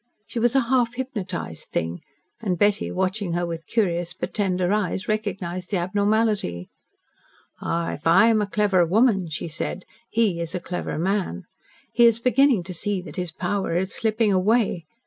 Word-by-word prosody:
She 235 - -4
was 240 +2 +2
a 270 - +5
half 245 -1 +1
hypnotised 205 - -5
thing, 85 +1 -2 0.4
and 190 -5 -1
Betty, 205 +3 +2
watching 190 0 -1
her 175 +1 0
with 165 -1 -6
curious 175 -6 0
but - - -5
tender 185 -2 +1
eyes, 195 -2 -1
recognised 185 -4 -3
the 200 - 0
abnormality. 200 - 0 0.9
"Ah, 170 0 -1
if 150 - -5
I 180 +7 +7
am 225 -2 +4
a 205 - -1
clever 200 -4 +3
woman," 195 0 +3
she 155 +2 -4
said, 170 +3 -4 0.2
"he 215 -7 +1
is 170 +2 -4
a - - -1
clever 175 -2 -4
man. 185 - -1 0.5
He 235 0 +6
is 230 -1 +4
beginning 250 -3 +3
to 185 +1 -6
see 200 +3 -2
that 155 -5 -10
his 180 -2 -3
power 190 0 -1
is 190 +2 -1
slipping 220 -1 +1
away. 190 -2 +2
190 Hz, 170 wpm, -24 LUFS, 175-220 Hz, 0.9 s, I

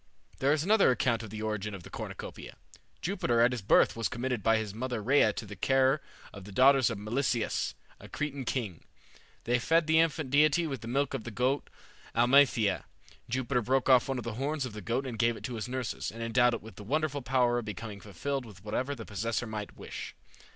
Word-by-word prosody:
There 135 +2 +3
is 150 0 +2
another 210 +3 +5
account 120 -2 +1
of 110 - -8
the 110 +1 -6
origin 105 -1 -3
of 90 - -10
the - - -12
Cornucopia. - - -7 0.5
Jupiter 120 -1 0
at 120 +2 +5
his 125 -2 -3
birth 100 - +4
was 115 -1 0
committed 125 -2 -2
by 115 +2 +3
his 110 -2 -3
mother 120 +1 -3
Rhea 120 0 +4
to 110 - -6
the 105 0 -9
care 135 +6 +2 0.3
of 100 - -9
the 100 - -10
daughters 130 +3 +5
of 115 - -4
Melisseus, 120 +3 -1 0.2
a - - -12
Cretan 145 -2 -3
king. 115 - -3 0.6
They 120 +1 +1
fed 165 +6 +3
the 160 +1 +4
infant 160 -4 +1
deity 155 +4 +4
with 135 -5 -4
the 115 - -8
milk 135 +3 0
of - - -3
the - - -6
goat 125 +5 0 0.5
Amalthea. 120 -4 +4 0.4
Jupiter 125 +1 0
broke 130 +3 +1
off 125 -2 +6
one 135 - -1
of 125 - -4
the 115 - -4
horns 145 0 -1
of 120 - -7
the 105 - -7
goat 120 +8 -1
and 120 -4 -5
gave 120 -1 +2
it - - -12
to 125 - -4
his 115 0 -4
nurses, 130 -2 -3
and 115 +1 -7
endowed 120 +1 +3
it - - -8
with 110 -4 -12
the 105 - -8
wonderful 145 +4 -1
power 125 -1 +2
of 120 - -6
becoming 105 0 -6
filled 130 +8 -3
with 100 -5 -13
whatever 130 +7 -2
the 115 -4 -8
possessor 115 +3 -2
might 105 -2 -6
wish. - - -7
120 Hz, 220 wpm, -30 LUFS, 110-135 Hz, 0.6 s, off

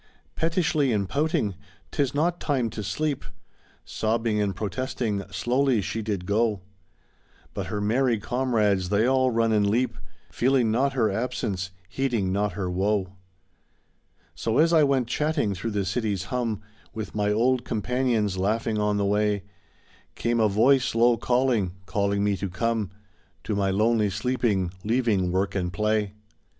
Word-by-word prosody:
Pettishly 160 -4 +1
and 100 -3 0
pouting, 140 -6 0 0.2
" - - -33
'Tis 140 -2 0
not 170 +4 +1
time 130 -7 0
to 105 - -5
sleep,*' 150 +7 -2 0.6
Sobbing 110 -1 0
and 100 -2 -1
protesting, 110 0 -2
slowly 120 +6 +1
she 110 +3 -3
did 100 -4 -3
go; 105 0 +1 0.9
But - - -4
her 105 - -3
merry 115 +3 +2
comrades 105 -6 +1
they 105 +3 +3
all 130 0 +3
run 115 -1 +1
and 105 -2 +3
leap, 120 -1 +1 0.4
Feeling 125 -3 +2
not 135 +5 +1
her 115 -6 +2
absence, 100 -4 -2 0.2
heeding 110 -2 -1
not 100 +1 0
her 95 -3 -3
woe. 95 +1 0 1.2
So 115 +2 -1
as 165 +2 +4
I 160 - +6
went 135 -4 +2
chatting 150 -6 0
through 95 +5 -4
the 100 -2 -1
city's 100 -1 -1
hum. 115 -4 -1 0.3
With 110 -3 -5
my 105 -1 +1
old 120 +4 +2
companions 115 -3 0
laughing 110 +2 0
on 105 0 +1
the 100 - +1
way, 105 0 +1 0.7
Came 120 0 0
a 110 -1 +4
voice 125 +5 +3
low 120 +1 +5
calling, 120 -5 +1
calling 100 0 0
me 100 -1 +2
to 100 +1 -3
come 110 +2 -1 0.5
To 105 - -2
my 100 -1 +1
lonely 105 +2 +2
sleeping, 105 -3 0
leaving 110 -6 +1
work 95 +2 0
and 90 -2 -1
play. 105 +2 0
110 Hz, 150 wpm, -25 LUFS, 100-125 Hz, 1.2 s, I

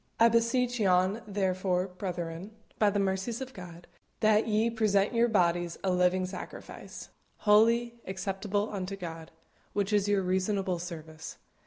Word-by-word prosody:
I 230 +1 +7
beseech 235 +2 +1
yon 190 +2 +2
therefore, 185 -2 0
brethren, 180 +1 -5 0.2
by 210 - +5
the 205 - -1
mercies 195 +4 -1
of 265 0 -7
God, 175 -3 -10 0.4
that 215 0 +4
ye 220 +2 +2
present 210 -2 +2
your 235 0 +4
bodies 175 -5 +1
a 190 - +1
living 180 +1 +2
sacrifice, 185 +1 -9 0.3
holy, 230 +3 +3
acceptable 195 +2 -2
unto 195 0 -3
God, 165 -4 -7 0.4
which 205 0 -1
is 205 -1 +3
your 200 -2 +2
reasonable 185 0 0
service. 160 -2 -8
195 Hz, 140 wpm, -29 LUFS, 180-215 Hz, 0.4 s, I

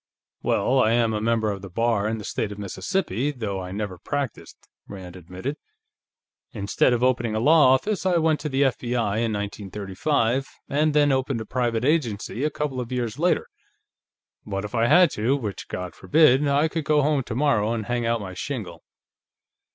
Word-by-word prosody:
"Well, 130 +1 +2
I 110 -1 +3
am 115 -2 +2
a 105 - -2
member 110 -1 +1
of 100 -1 -6
the 100 - -8
Bar 115 +1 +1
in 110 +1 -1
the 105 - -7
State 105 +1 -3
of 100 - -7
Mississippi, 120 - -2
though 110 -9 -4
I 90 0 -7
never 100 -2 -4
practiced," 140 - -5 0.2
Rand 95 -3 -9
admitted. 95 - -6 1.0
"Instead 100 +2 +1
of 120 0 +1
opening 120 -3 +1
a - - +1
law 145 0 +6
office, 200 +10 -2
I 185 -2 +2
went 160 -2 +2
into 150 - -2
the 135 +1 +2
F.B.I., 120 -5 0
in 115 0 0
1935, 105 +6 -1 0.2
and 150 +1 +1
then 145 -1 +4
opened 130 -2 0
a 110 - -5
private 120 -1 -1
agency 130 -5 0
a 150 - +2
couple 145 -3 -3
of 120 0 -7
years 120 0 -3
later. 180 +2 +2 1.0
But 95 0 -4
if 105 - -8
I 115 -1 +2
had 175 +4 +6
to, 120 +6 +1
which 105 -7 -5
God 90 -1 -5
forbid, 145 - +4
I 140 +3 +3
could 160 0 -3
go 150 -1 +3
home 145 -1 +2
tomorrow 120 -3 +1
and 115 -2 -2
hang 120 +1 -1
out 115 0 +1
my 95 -2 -7
shingle." 90 - -5
120 Hz, 185 wpm, -24 LUFS, 105-140 Hz, 1.0 s, law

